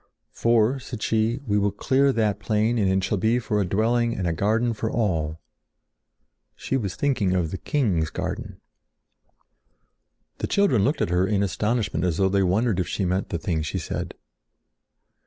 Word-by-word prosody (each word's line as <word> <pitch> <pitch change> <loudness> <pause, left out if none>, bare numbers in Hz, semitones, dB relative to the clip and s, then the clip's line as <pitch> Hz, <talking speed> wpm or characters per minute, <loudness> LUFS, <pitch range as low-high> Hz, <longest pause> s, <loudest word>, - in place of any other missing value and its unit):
"For," 115 +3 +2
said 125 -4 -7
she, 115 +3 +1
"we 105 -3 +1
will 100 0 +2
clear 135 +7 +2
that 105 -4 0
plain, 110 +3 +1
and 100 -3 +2
it 95 0 +1
shall 100 0 0
be 110 +5 +2
for 105 -3 -1
a - - 0
dwelling 115 +4 +1
and 95 - -2
a 85 - 0
garden 110 +7 +1
for 110 0 -3
all." 80 -9 -1 1.2
She - - -3
was 100 -8 -2
thinking 120 -10 +1
of 85 -3 0
the 95 - -5
king's 95 - 0
garden. - - -5 1.8
The - - -2
children 165 - +3
looked 145 +8 0
at - - -2
her 90 +2 +2
in 100 -1 +1
astonishment 105 +5 -1
as 85 -3 0
though 95 -1 +3
they 100 +1 +2
wondered 100 +2 +1
if 90 - -1
she 100 - -2
meant 95 +2 -1
the 85 - -2
thing 80 -1 -2
she 75 - -3
said. - - -4
105 Hz, 175 wpm, -24 LUFS, 95-115 Hz, 1.8 s, children